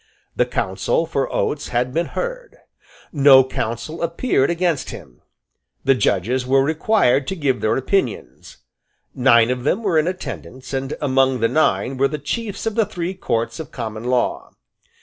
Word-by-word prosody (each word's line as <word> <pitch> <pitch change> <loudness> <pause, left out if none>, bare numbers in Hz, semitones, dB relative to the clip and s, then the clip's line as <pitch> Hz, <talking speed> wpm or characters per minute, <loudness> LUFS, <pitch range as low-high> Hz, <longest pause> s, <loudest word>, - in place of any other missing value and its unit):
The - - +2
counsel 95 - -1
for 140 -4 -2
Oates 145 - -1
had 125 +1 -1
been 170 +3 0
heard. - - -5 0.6
No 140 -3 +7
counsel 120 +4 -4
appeared 170 - +1
against 170 -4 0
him. 60 -3 -11 0.6
The 135 - +4
judges 125 +1 0
were 135 +1 +3
required 150 - +2
to 190 - -2
give 140 -7 0
their 110 +1 +1
opinions. 130 - -2 0.6
Nine 120 -2 +4
of 125 -1 -3
them 190 - 0
were 180 -6 +2
in 155 - 0
attendance; 130 - -6
and 135 +1 -2
among 135 -2 +2
the 115 - +3
nine 125 -2 +1
were 135 +1 +3
the 150 - -4
Chiefs 205 - -4
of 225 - -1
the 220 -2 +1
three 180 -2 -4
Courts 115 -10 -2
of 160 - -7
Common 110 +1 -6
Law. 125 -1 -1
135 Hz, 160 wpm, -20 LUFS, 125-170 Hz, 0.6 s, No